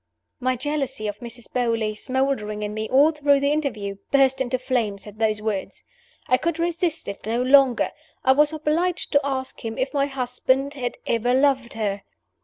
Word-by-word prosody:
My 255 0 +1
jealousy 270 -3 -2
of 205 0 -5
Mrs. 240 0 -9
Beauly, 230 -3 0
smoldering 255 -5 -1
in 210 0 -3
me 215 0 -4
all 285 +4 +5
through 290 -2 +3
the 280 +1 +1
interview, 220 -10 -2
burst 270 -1 +3
into 255 0 0
flames 235 -6 -2
at 210 0 -12
those 215 -1 +1
words. 210 -3 -3 0.4
I 255 - +4
could 335 +3 -1
resist 335 -1 -1
it 200 - -6
no 230 +2 0
longer 265 -1 +4 0.3
I 260 - +5
was 295 +3 +5
obliged 325 +4 -1
to 285 - +4
ask 265 -2 -3
him 225 -1 -4
if 265 +2 -1
my 280 -1 +2
husband 265 +1 0
had 250 -4 -4
ever 240 +2 +1
loved 265 -3 +2
her. 205 -3 -2
260 Hz, 180 wpm, -23 LUFS, 225-280 Hz, 0.4 s, all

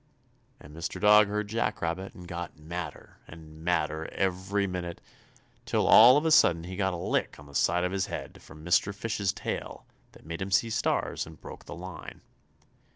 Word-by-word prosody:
And 75 +1 -14
Mr. 85 +2 -5
Dog 105 +1 +6
heard 105 0 -2
Jack 115 +3 -1
Rabbit 85 +4 -3
and 90 -1 -11
got 85 -2 -6
madder 80 +3 -7
and 80 -1 -13
madder 80 -2 0
every 95 +1 -1
minute, 90 -2 -5 0.7
till - - +1
all 125 +5 +9
of 150 - 0
a 160 - +2
sudden 85 - +5
he 90 +2 -7
got 95 -1 0
a - - -4
lick - - -1
on 70 - -13
the 70 - -15
side 90 +5 +2
of 90 - 0
the 95 -1 -1
head - - -7
from 80 0 -14
Mr. 95 +3 +2
Fish's 100 -2 -1
tail - - -5 0.3
that - - -18
made 85 +2 -6
him 95 - -3
see 115 +4 +2
stars 115 -6 -1
and 80 -1 -13
broke - - -11
the - - -8
line. 90 -2 -9
90 Hz, 190 wpm, -28 LUFS, 85-100 Hz, 0.7 s, all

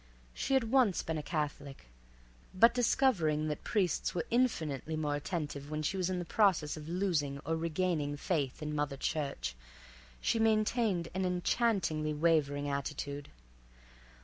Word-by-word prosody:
She 270 - 0
had 230 -4 +1
once 250 -8 +3
been 160 -1 -2
a - - -3
Catholic, 145 - -4 0.7
but 230 +5 +6
discovering 175 - +2
that 150 - -4
priests 185 -6 0
were 170 - -1
infinitely 160 - 0
more 150 -2 -1
attentive 145 -2 -4
when 155 0 -3
she 155 - 0
was 185 -1 0
in 180 -1 -2
process 180 -6 +2
of 155 0 -8
losing 170 -6 0
or 160 +2 0
regaining 160 -3 -1
faith 145 -3 -2
in 150 0 -3
Mother 145 -2 -1
Church, 140 - -2 0.6
she 225 - +1
maintained 215 -5 +2
an 190 +1 -1
enchantingly 180 -4 +1
wavering 145 -3 +2
attitude. 140 0 -4
160 Hz, 140 wpm, -32 LUFS, 145-190 Hz, 0.7 s, but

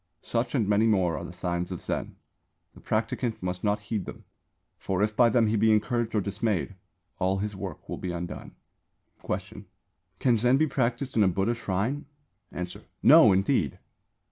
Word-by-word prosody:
Such 120 +3 -1
and 115 -6 +1
many 105 +2 +3
more 95 -6 +2
are - - -5
the - - -7
signs 90 0 -3
of 90 - -4
Zen. - - -4 0.6
The - - -16
practicant 115 -6 -2
must 90 0 -3
not 105 0 +1
heed 105 -2 -3
them; - - -9 0.6
for 95 +1 -1
if 105 0 0
by 120 0 +5
them 115 0 +3
he 110 +1 +1
be 110 +1 +4
encouraged 110 +2 +1
or 105 - +3
dismayed, 100 0 -1 0.5
all 95 +1 +1
his 105 +1 -3
work 95 - -7
will - - -4
be 90 - -3
undone. 85 0 -6 0.7
Question. 100 +1 -5 0.5
Can 120 +1 +3
Zen 125 +4 +3
be 155 - +3
practised 125 -2 -1
in 110 - +4
a 100 - +5
Buddha 95 +5 +1
Shrine? 120 +6 -2 0.4
Answer. 90 0 -6 0.2
No, - - +8
indeed! 95 - +1
105 Hz, 175 wpm, -27 LUFS, 95-115 Hz, 0.7 s, No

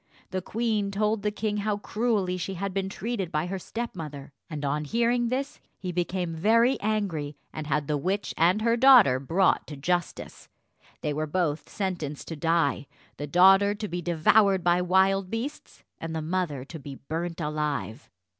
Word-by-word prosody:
The 185 0 -2
queen 215 0 -1
told 210 +1 0
the 210 - 0
king 210 0 -2
how 205 0 -1
cruelly 210 -4 -1
she 185 +2 -4
had 195 +1 -3
been 190 0 -1
treated 195 -4 -4
by 155 -1 0
her 190 +2 -4
stepmother, 160 -12 -6 0.2
and 150 -3 -4
on 145 +2 -1
hearing 235 +8 +1
this 265 +3 -3 0.2
he 185 -1 -5
became 175 0 -2
very 230 +9 +3
angry, 185 -9 -2 0.2
and 155 -1 -5
had 150 0 0
the 150 +1 0
witch 190 +7 -2
and 180 +6 +3
her 230 0 +3
daughter 240 - +7
brought 170 +8 +2
to 150 - -8
justice. 175 +4 -3 0.5
They 150 - -1
were 155 +1 -2
both 155 -2 -1
sentenced 175 -7 -4
to 165 - -4
die 165 -3 +1 0.3
the 145 - -5
daughter 195 +5 +5
to 210 0 -4
be 175 -1 -4
devoured 180 +3 +3
by 175 0 +3
wild 190 +1 +2
beasts, 235 +8 -6 0.2
and 160 0 -5
the 160 - -2
mother 160 -6 -2
to 160 +3 -9
be 140 0 -8
burnt 165 +5 -5
alive. 150 -5 -3
180 Hz, 175 wpm, -27 LUFS, 155-210 Hz, 0.5 s, daughter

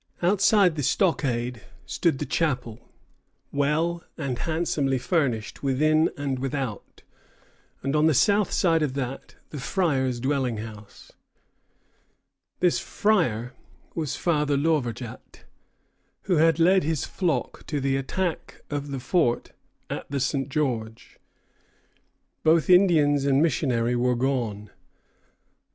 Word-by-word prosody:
Outside 195 -2 +4
the - - -1
stockade 125 - 0 0.2
stood 165 -6 0
the - - -3
chapel, 125 -8 -2 0.6
"well 155 +4 0
and 135 -6 -3
handsomely 155 -5 0
furnished 125 - -1
within 155 +4 +2
and 140 -2 -2
without, 135 -4 -5 0.8
and 135 +2 -1
on 150 +1 +4
the 160 - +3
south 205 - +3
side 165 -3 +2
of 140 -3 -1
that 135 -1 -5 0.2
the 150 - -6
Fryer's 130 -6 0
dwelling 130 -3 -1
house." 105 -1 -10 1.5
This 180 -1 +3
"Fryer" 125 - 0 0.4
was 155 -4 -3
Father 150 -4 +1
Lauverjat, 130 -6 -2 0.8
who 180 -4 +1
had 165 +1 +4
led 185 +3 +4
his 155 -1 -1
flock 165 -9 -2
to 150 - -2
the 135 0 0
attack 165 +6 -3
of 145 0 -3
the 135 -1 -4
fort 125 -2 0 0.4
at - - -6
the 140 0 -2
St. 135 +1 -1
George. 120 -7 -3 1.2
Both 165 +3 +4
Indians 155 -7 +5
and 135 -1 +3
missionary 125 -6 +1
were 125 +1 +1
gone. 120 -5 -2
140 Hz, 115 wpm, -25 LUFS, 125-165 Hz, 1.5 s, Indians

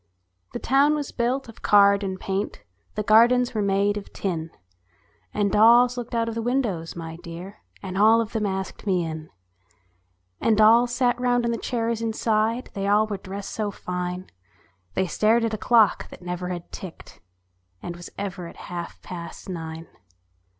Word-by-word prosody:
The - - -2
town 280 +4 +3
was 295 -2 -4
built 250 +2 -1
of 230 - -13
card 200 0 +5
and 190 -1 -3
paint, 195 - -3 0.3
The 210 - -1
gardens 240 +3 +5
were 215 - 0
made 200 +1 +1
of 205 - -8
tin; 165 -4 -3 0.8
And 205 -2 0
dolls 240 +4 +6
looked 245 -1 -5
out 230 0 +1
at 230 - -2
the 230 - -3
windows, 225 -9 -1 0.3
dear, 175 +3 -9 0.2
And 190 -1 -5
all 220 +2 +6
of 225 -1 -2
them 215 -2 0
asked 190 +1 -5
me 180 -3 +2
in. 160 -1 -6 1.1
And 220 -2 +2
dolls 230 +3 +6
sat 245 -1 +1
round 245 -1 +2
on 235 - +1
the 230 - -1
chairs 230 -1 -1
inside; 225 +1 0
They 195 -1 -2
all 210 +2 +4
were 210 -2 -4
dressed 195 +1 -7
so 215 -2 -2
fine; 180 -1 -5 0.6
They 190 - +2
stared 225 +5 +2
at 225 - -2
a - - -1
clock 225 -2 +3
that - - -13
never 180 0 -4
had 175 -1 -6
ticked, 185 -4 -10 0.6
And 175 - -5
was 175 0 -9
ever 185 -3 -5
at - - -12
half 175 -1 -6
past 175 +2 -8
nine. 165 -2 -6
210 Hz, 170 wpm, -24 LUFS, 185-230 Hz, 1.1 s, dolls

